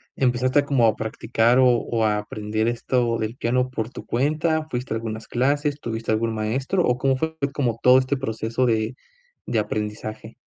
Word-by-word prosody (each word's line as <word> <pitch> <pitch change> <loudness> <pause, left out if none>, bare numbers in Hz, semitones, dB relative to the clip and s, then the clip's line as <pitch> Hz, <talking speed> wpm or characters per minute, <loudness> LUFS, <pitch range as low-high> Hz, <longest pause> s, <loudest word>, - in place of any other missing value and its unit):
empezaste 130 +2 +2
como 130 -5 +3
a 110 - +2
practicar 115 +2 +1
o 130 - +6
o 120 -2 +1
a 105 -1 +2
aprender 105 +1 -2
esto 120 0 0
del 110 +2 -3
piano 125 +1 0
por 115 -3 -3
tu - - -10
cuenta? 155 +5 0
¿Fuiste 125 -3 -3
a - - 0
algunas 110 0 -6
clases, 145 +3 0
tuviste 115 -3 -3
algún 115 +1 0
maestro, 130 - 0
o 125 -4 +2
cómo 135 0 +1
fue 160 +3 -2 0.2
como 120 -6 -1
todo 125 +1 +7
este 130 +2 -1
proceso 115 0 -1
de 110 +1 0 0.5
de 115 - 0
aprendizaje? 110 +1 -4
120 Hz, 175 wpm, -23 LUFS, 110-130 Hz, 0.5 s, todo